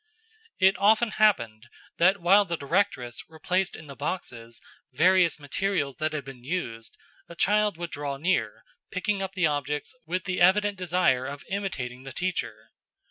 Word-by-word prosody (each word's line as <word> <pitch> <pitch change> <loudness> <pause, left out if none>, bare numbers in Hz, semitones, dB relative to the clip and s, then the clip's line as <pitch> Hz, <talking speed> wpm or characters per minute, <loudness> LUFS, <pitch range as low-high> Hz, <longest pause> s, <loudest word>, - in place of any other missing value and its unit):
It 190 +1 +5
often 220 +2 +4
happened 120 - +1 0.3
that 185 +4 +4
while 195 +4 +5
the 170 -3 -3
directress 140 - -1
replaced 180 +4 -1
in 160 - -11
the 140 -2 -10
boxes 120 -7 -5 0.3
various 175 +4 +3
materials 145 -1 -2
that 155 0 -1
had 150 -4 -4
been 130 -3 -11
used, 120 -8 -4 0.3
a 170 - -10
child 210 +1 +2
would 170 -1 -5
draw 140 -1 -4
near, 180 +6 -1 0.3
picking 200 +1 -1
up 195 0 -5
the 180 -3 +2
objects, 145 - -2
with 180 +1 -2
the 180 -2 -2
evident 205 +3 +4
desire 175 -8 +1
of 140 0 -8
imitating 130 -11 -3
the 135 -1 -9
teacher. 120 -12 -3
170 Hz, 155 wpm, -27 LUFS, 135-190 Hz, 0.3 s, It